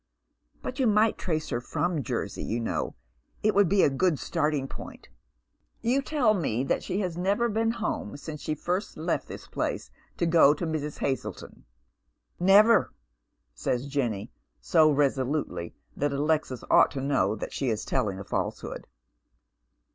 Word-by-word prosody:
But 255 - -5
you 260 - +3
might 215 +1 +4
trace 155 -4 -2
her/rom 150 +7 -1
Jersey, 115 -7 -3
you 115 - -2
know. 115 - -2 0.5
It 215 0 +3
would 200 -3 +4
be 200 0 +4
a - - +5
good 155 +3 +2
starting 150 -4 -1
point." - - -10 0.4
" - - -45
You 275 +2 +3
tell 270 -7 +2
me 135 - 0
that - - 0
she 195 - -2
has 180 -3 -3
never 200 +6 +1
been 225 0 +1
home 220 -9 -3
since 150 0 -7
she 155 - -2
first 180 +6 -3
left - - -1
tliis - - -9
place - - -3 0.3
to 170 - +1
go 160 -3 +6
to 170 - -3
Mrs. 155 -2 -3
Uazletou." 135 -1 -3 0.4
" - - -46 0.2
Never," 220 +3 +6 0.6
says 120 - -2
Jenny, 120 -7 -2 0.3
so 160 -2 +4
resolutely 135 - 0 0.2
that 145 0 0
Alexis 145 -3 0
ought - - +7
to 140 - -5
know 130 -8 +1
eho 130 +5 -3
is 110 -1 -2
telling 100 -3 0
a 100 - -6
falsehood. - - -4
150 Hz, 155 wpm, -27 LUFS, 130-190 Hz, 0.6 s, ought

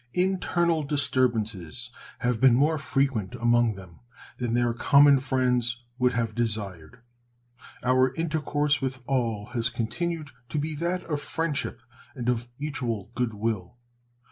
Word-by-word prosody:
Internal 180 -3 +1
disturbances 125 - 0 0.3
have 125 -1 0
been 130 -3 +7
more 150 +4 +3
frequent 135 -7 0
among 120 -2 +3
them 95 -3 -13 0.4
than 120 -2 -1
their 120 -1 +2
common 140 +3 +6
friends 125 -2 0 0.2
would 125 0 +3
have 115 -2 -1
desired. 105 -3 -3 0.8
Our 130 +1 +3
intercourse 150 -3 0
with 130 -1 -3
all 115 -6 -1
has 120 -1 0
continued 155 +7 -3 0.2
to - - -3
be 155 +2 -1
that 175 +3 -1
of 150 -3 -3
friendship 160 0 -2 0.3
and 120 0 -2
of 120 0 -1
mutual 125 -8 -3
good 120 -3 -1
will. 105 -1 -3
125 Hz, 130 wpm, -27 LUFS, 115-145 Hz, 0.8 s, been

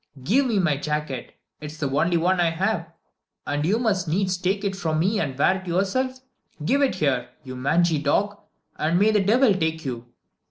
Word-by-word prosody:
"Give 255 - +2
me 225 -4 0
my 160 -7 +2
jacket. 150 -3 -4 0.2
It 150 - -7
is 150 +1 -10
the 150 -3 -1
only 170 +5 +2
one 180 +2 +1
I 170 -1 +3
have, 170 0 -2 0.5
and 145 +1 -1
you 195 +8 +2
must 205 -7 0
needs 185 +3 0
take 190 +3 -1
it 195 -1 -1
from 160 -5 -1
me 195 +7 +1
and 135 -5 -3
wear 185 +6 +3
it 185 - -14
yourself. 255 +9 -1 0.4
Give 280 - +2
it 270 -8 +2
here, 130 -7 0
you 130 -2 -8
mangy 160 +5 +2
dog, 200 +8 0 0.4
and 160 +3 +1
may 210 +3 +4
the 215 - +3
devil 230 +3 +4
take 160 -3 -2
you." 120 -2 -5
175 Hz, 200 wpm, -24 LUFS, 150-200 Hz, 0.5 s, may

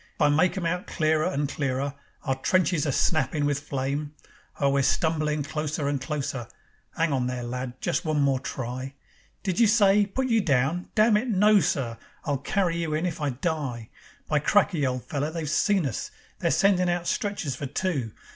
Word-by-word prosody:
I 150 -2 +4
make 160 +6 +3
'em 180 - -2
out 180 +2 -1
clearer 155 -1 +1
and 145 -5 -1
clearer, 140 -1 -2 0.3
Our 135 - 0
trenches 165 +3 +1
a - - +1
snappin' 145 +1 +1
with 145 -1 +1
flame. 145 +1 -3 0.4
Oh, 140 -1 +3
we're 140 0 +2
stumblin' 155 +1 +1
closer 150 0 -2
and 140 -2 -1
closer. 140 -5 -3 0.5
'Ang 165 -2 +1
on 125 -2 0
there, 125 -1 -3
lad! 125 +1 -5
Just 160 - 0
one 155 -2 0
more 140 -2 +2
try. 130 +2 -5 0.5
Did 185 -3 -1
you 230 - +6
say: 205 -2 +4
Put 260 +6 -1
you 230 -3 +3
down? 150 +2 +1
Damn 215 0 +5
it, 230 +5 -2
no, 210 -1 +5
sir! 125 -8 -1 0.3
I'll 145 -4 0
carry 175 +3 0
you 165 -2 -1
in 160 +3 -1
if 165 -3 -3
I 145 - +1
die. 130 -5 -3 0.4
By 150 - +2
cracky! 170 -3 +2
old 125 -2 -2
feller, 145 +3 -2
they've 160 -1 -4
seen 190 +4 +2
us. 130 - -3 0.3
They're - - +1
sendin' 185 -2 +3
out 175 0 -1
stretchers 190 - -2
for 140 - -5
two. 145 - -2
150 Hz, 185 wpm, -26 LUFS, 135-180 Hz, 0.5 s, you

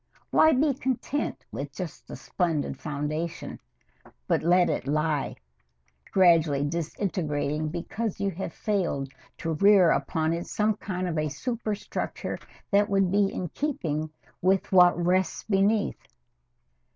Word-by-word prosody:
Why 315 - +6
be 285 +1 +3
content 265 +2 -2
with - - -5
just - - -7
the - - -7
splendid 165 -5 -2
foundation, 155 +2 -4 0.7
and - - +1
let 175 +2 +4
it - - -2
lie, 150 0 0 0.8
gradually 165 -6 +4
disintegrating 155 -2 -2
because 190 +6 -4
you 200 0 0
have 180 -1 -5
failed 165 -10 -2 0.2
to 165 -1 -2
rear 195 +1 +6
upon 160 -2 0
it 170 +1 -4
some 210 0 +1
kind 185 -3 -3
of 160 -3 -1
a 155 0 0
superstructure 215 - -4 0.3
that 205 +1 +4
would 195 -2 +2
be 200 0 +3
in 180 - -4
keeping 155 - -2 0.3
with 190 +1 +2
what 180 -2 +6
rests 180 +1 +1
beneath? 205 +1 +1
180 Hz, 125 wpm, -27 LUFS, 155-200 Hz, 0.8 s, Why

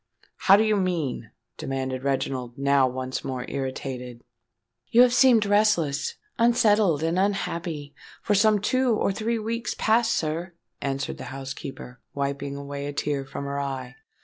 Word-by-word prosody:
"How 195 - +6
do 210 - +4
you 215 -1 +2
mean?" 160 - -2 0.3
demanded 130 -1 -3
Reginald, 130 -3 -2
now 140 -1 +3
once 130 0 -4
more 130 -2 -4
irritated. 130 -3 -5 0.6
"You 240 +2 +6
have 245 -1 +3
seemed 245 -4 +5
restless, 205 -9 +2 0.2
unsettled, 215 - +3
and 165 +3 +1
unhappy, 170 -6 -2 0.3
for 210 - +1
some 215 +1 +4
two 250 +3 +2
or 205 - +1
three 225 +4 -1
weeks 230 +2 -3
past, 225 +1 +3
sir," 165 +3 -2 0.3
answered 135 -1 -3
the - - -6
housekeeper, 135 -2 -7 0.2
wiping 140 0 -2
away 140 0 -5
a 145 - -4
tear 145 -1 -2
from 140 - -6
her 140 0 -3
eye. 130 -3 -4
145 Hz, 150 wpm, -25 LUFS, 135-210 Hz, 0.6 s, How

